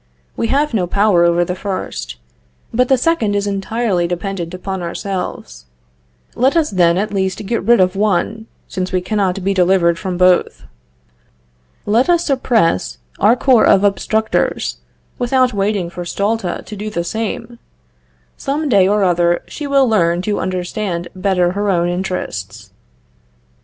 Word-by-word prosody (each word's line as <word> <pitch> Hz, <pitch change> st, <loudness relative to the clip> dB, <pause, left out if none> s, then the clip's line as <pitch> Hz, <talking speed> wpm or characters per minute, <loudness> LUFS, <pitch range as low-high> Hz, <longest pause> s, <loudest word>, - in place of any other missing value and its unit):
We 230 Hz, -, -1 dB
have 285 Hz, +3 st, +1 dB
no 185 Hz, -5 st, 0 dB
power 200 Hz, -2 st, +3 dB
over 170 Hz, 0 st, +2 dB
the 180 Hz, -, -3 dB
first, 190 Hz, +1 st, -5 dB, 0.6 s
but 250 Hz, +2 st, +2 dB
the 265 Hz, -, +5 dB
second 245 Hz, -8 st, +1 dB
is 200 Hz, 0 st, 0 dB
entirely 200 Hz, -2 st, -1 dB
dependent 175 Hz, -1 st, -4 dB
upon 185 Hz, +1 st, -5 dB
ourselves. 170 Hz, -, -5 dB, 0.7 s
Let 265 Hz, +6 st, +2 dB
us 315 Hz, -2 st, +1 dB
then 175 Hz, -2 st, +3 dB
at 210 Hz, +2 st, -2 dB
least 190 Hz, 0 st, -2 dB
get 230 Hz, +3 st, -1 dB
rid 235 Hz, 0 st, +4 dB
of 185 Hz, 0 st, +2 dB
one, 215 Hz, +2 st, 0 dB, 0.2 s
since 185 Hz, -1 st, -4 dB
we 185 Hz, -, +1 dB
cannot 190 Hz, 0 st, -1 dB
be 195 Hz, +1 st, +1 dB
delivered 180 Hz, -2 st, +2 dB
from 185 Hz, -1 st, -3 dB
both. 180 Hz, 0 st, +2 dB, 1.2 s
Let 230 Hz, +9 st, +2 dB
us 345 Hz, -1 st, +3 dB
suppress 225 Hz, -, +1 dB, 0.2 s
our 215 Hz, +4 st, +5 dB
corps 250 Hz, -2 st, +4 dB
of 190 Hz, -, +5 dB
Obstructors, 215 Hz, +2 st, 0 dB, 0.4 s
without 255 Hz, 0 st, +2 dB
waiting 200 Hz, -2 st, 0 dB
for 175 Hz, +1 st, -7 dB
Stulta 200 Hz, +1 st, -2 dB
to 215 Hz, -, -8 dB
do 210 Hz, +1 st, -5 dB
the 170 Hz, -4 st, -3 dB
same. 225 Hz, +5 st, -4 dB, 0.8 s
Some 290 Hz, +2 st, -2 dB
day 195 Hz, -6 st, +4 dB
or 205 Hz, 0 st, +2 dB
other 175 Hz, -1 st, +2 dB
she 295 Hz, -, -6 dB
will 275 Hz, -2 st, +3 dB
learn 175 Hz, -5 st, +2 dB
to 205 Hz, +1 st, -1 dB
understand 180 Hz, -1 st, -3 dB
better 185 Hz, -2 st, +1 dB
her 205 Hz, +2 st, -1 dB
own 175 Hz, -2 st, +1 dB
interests." 110 Hz, -, -5 dB
195 Hz, 150 wpm, -17 LUFS, 180-220 Hz, 1.2 s, the